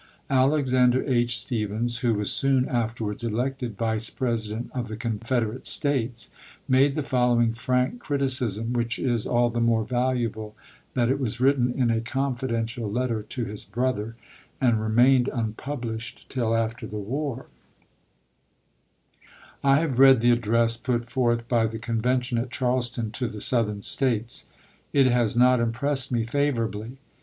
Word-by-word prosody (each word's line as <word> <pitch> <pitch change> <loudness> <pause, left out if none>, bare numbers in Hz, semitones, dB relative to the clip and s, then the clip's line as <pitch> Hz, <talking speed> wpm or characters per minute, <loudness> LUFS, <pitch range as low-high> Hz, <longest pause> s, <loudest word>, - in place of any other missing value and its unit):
Alexander 130 -2 +3
H. 120 -3 +1
Stephens, 120 0 -1
who 120 -3 +1
was 105 -1 0
soon 135 -1 +2
after 115 -1 -2
wards 105 +2 -4
elected 120 0 -2
Vice 110 0 -1
President 115 -2 -3
of 125 -2 -3
the 110 -1 -6
Confederate 115 +1 -2
States, 125 -5 0 0.4
made 135 +2 +3
the 150 - -1
following 120 -3 +2
frank 125 - -1
criticism 130 - -1
which 120 -1 -1
is 120 -4 0
all 120 0 +2
the 120 0 -2
more 115 -2 +2
valuable 120 -3 -2 0.4
that 120 0 +2
it 140 - 0
was 120 -4 -2
written 130 -2 +3
in 120 -2 +1
a 115 0 0
confidential 120 -3 -2
letter 120 -1 -1
to 115 +3 -5
his 105 0 -7
brother 115 0 -2 0.4
and 120 -5 +2
remained 120 +4 +4
unpublished 115 0 -5
till 115 -3 0
after 115 +1 -2
the 105 - -6
war: 130 +5 -4 2.2
I 140 0 +5
have 135 -7 -1
read 135 -2 +8
the 120 +1 +4
address 115 0 +2
put 120 -1 -2
forth 120 -2 0
by 115 -2 +2
the 110 +1 -5
Convention 120 +3 -1
at 125 +2 -3
Charleston 125 -3 -1
to 125 +3 -2
the 110 - -7
Southern 105 -4 +1
States. 120 -4 0 0.5
It 140 -2 +5
has 120 -3 +2
not 125 +1 +5
impressed 130 +4 +1
me 120 -2 +1
favorably. 115 -3 -2
120 Hz, 145 wpm, -25 LUFS, 115-130 Hz, 2.2 s, read